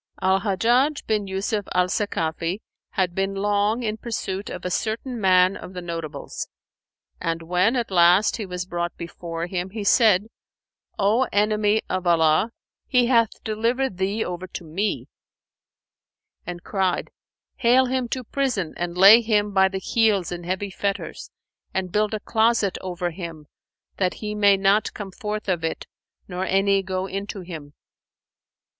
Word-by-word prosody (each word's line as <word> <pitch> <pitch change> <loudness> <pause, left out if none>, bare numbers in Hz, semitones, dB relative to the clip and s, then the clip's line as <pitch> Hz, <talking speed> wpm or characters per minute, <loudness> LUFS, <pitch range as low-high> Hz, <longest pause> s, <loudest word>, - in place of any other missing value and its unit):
Al 190 +1 +3
Hajjaj 240 +9 +1
bin 210 -2 0
Yusuf 195 +2 -2
al 180 0 +4
Sakafi 170 -3 -1 0.4
had 185 -3 0
been 195 +1 -1
long 205 +3 +1
in 215 -1 -2
pursuit 205 -4 -4
of - - -7
a 180 - -2
certain 230 +4 -2
man 185 0 +5
of 185 - -9
the 180 - -5
notables, 165 -4 -5 0.7
and 165 0 -2
when 180 +8 +2
at 235 -5 -1
last 180 +3 +5
he 215 - -4
was 180 0 -4
brought 175 -1 -3
before 170 0 -5
him, 180 +1 -3
he 210 +2 -5
said, 205 -2 +5 0.7
"O 220 +5 +2
enemy 210 +1 +2
of 185 -1 -2
Allah, 165 +5 +3 0.4
He 250 -2 +3
hath 235 -2 +2
delivered 230 0 -1
thee 200 +4 0
over 180 +1 -5
to 175 - -7
me;" 185 +7 -2 1.4
and 175 -1 -6
cried, 190 -3 -1 0.5
"Hale 255 +1 +4
him 255 -1 -1
to 255 +1 -3
prison 235 - -1
and 175 0 -3
lay 200 +5 +9
him 210 -2 +1
by 190 0 +5
the 190 0 -4
heels 200 -3 +1
in 175 -1 -6
heavy 190 +2 -2
fetters 200 +1 -3 0.5
and 190 -1 -1
build 210 +2 +1
a - - -3
closet 220 -2 +2
over 180 -1 -3
him, 165 -3 -8 0.5
that 185 -2 0
he 210 -1 -5
may 205 -2 +4
not 195 +2 +2
come 200 -2 -6
forth 210 +2 -5
of 175 -4 0
it 160 - -3 0.4
nor 180 0 -3
any 195 +1 +2
go 185 0 -3
into 195 +1 -5
him." 160 -5 -9
195 Hz, 155 wpm, -24 LUFS, 180-215 Hz, 1.4 s, lay